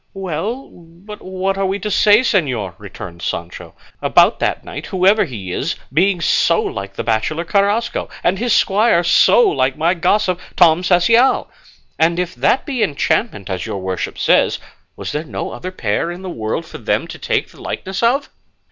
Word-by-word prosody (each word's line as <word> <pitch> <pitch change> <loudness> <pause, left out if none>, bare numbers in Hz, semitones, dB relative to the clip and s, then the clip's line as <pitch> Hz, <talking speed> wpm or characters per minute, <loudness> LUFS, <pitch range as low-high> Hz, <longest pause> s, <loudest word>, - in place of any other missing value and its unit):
"Well, 195 - -4
but 175 +5 -13
what 190 +1 -3
are 195 - +1
we 195 +1 -1
to 210 +1 -4
say, 210 +3 +5
señor," 130 - 0
returned 85 0 -10
Sancho, 85 -1 -5 0.3
"about - - +4
that - - -1
knight, - - -7
whoever 195 +3 +3
he 105 - -7
is, - - -2 0.2
being 180 +3 +2
so 170 0 +3
like 100 0 -4
the - - -3
bachelor 120 +9 -1
Carrasco, 205 +5 0
and 185 +2 +1
his 240 +1 -1
squire 205 -3 +3
so 470 - +5
like 130 - 0
my 165 +3 +2
gossip, 185 +1 +1 0.2
Tom 165 0 +5
Cecial? 230 +8 +3 0.5
And 165 +1 +3
if 180 0 -2
that 260 - +1
be 260 -5 -3
enchantment, 155 - 0
as 95 -2 -4
your - - -4
worship 95 -1 -4
says, - - +3 0.4
was - - -6
there 150 - -3
no 160 - -5
other 185 - -6
pair 115 - -1
in 175 +2 -7
the 185 - -5
world 110 -6 -3
for - - -10
them - - -1
to - - -10
take - - -1
the - - -16
likeness 190 +1 -4
of?" 255 +5 +1
180 Hz, 175 wpm, -18 LUFS, 150-205 Hz, 0.5 s, say